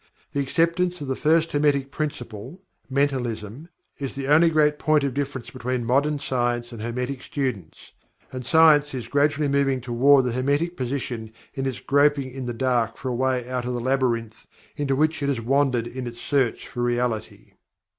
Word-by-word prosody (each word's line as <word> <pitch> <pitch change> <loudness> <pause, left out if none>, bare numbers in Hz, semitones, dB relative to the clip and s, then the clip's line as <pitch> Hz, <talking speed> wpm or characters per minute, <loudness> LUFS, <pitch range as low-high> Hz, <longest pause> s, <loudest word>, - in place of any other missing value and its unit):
The 140 - -1
acceptance 170 +5 +1
of 145 - -5
the 130 - -1
First 160 +3 +2
Hermetic 145 -2 +1
Principle 130 - -5 0.3
(Mentalism) 130 - -2 0.3
is 135 -2 -4
the 135 0 -4
only 160 +3 +6
great 150 -2 +2
point 155 -2 +3
of 140 -2 -1
difference 140 -3 -4
between 125 0 -3
Modern 140 +5 +2
Science 120 -3 -1
and 115 -2 -8
Hermetic 125 +3 -3
students, 125 - -5 0.4
and 130 -1 -6
Science 150 -1 +5
is 120 -3 -5
gradually 145 +3 +2
moving 140 -1 +1
toward 130 +2 +4
the 125 - 0
Hermetic 145 +8 0
position 125 -4 -4 0.2
in 135 -2 -2
its 125 -2 -3
groping 140 -1 +2
in 130 -1 -6
the - - -2
dark 120 -3 0
for 130 - -4
a 125 - -2
way 130 -1 0
out 125 -1 -3
of 125 0 -2
the - - -2
Labyrinth 120 -3 -1 0.3
into 140 -2 0
which 155 +2 +1
it 140 - 0
has 135 -4 0
wandered 130 0 +1
in 125 +1 -6
its 120 0 -8
search 135 -5 0
for 120 - -5
Reality. 120 -2 -2
135 Hz, 175 wpm, -24 LUFS, 120-145 Hz, 0.4 s, only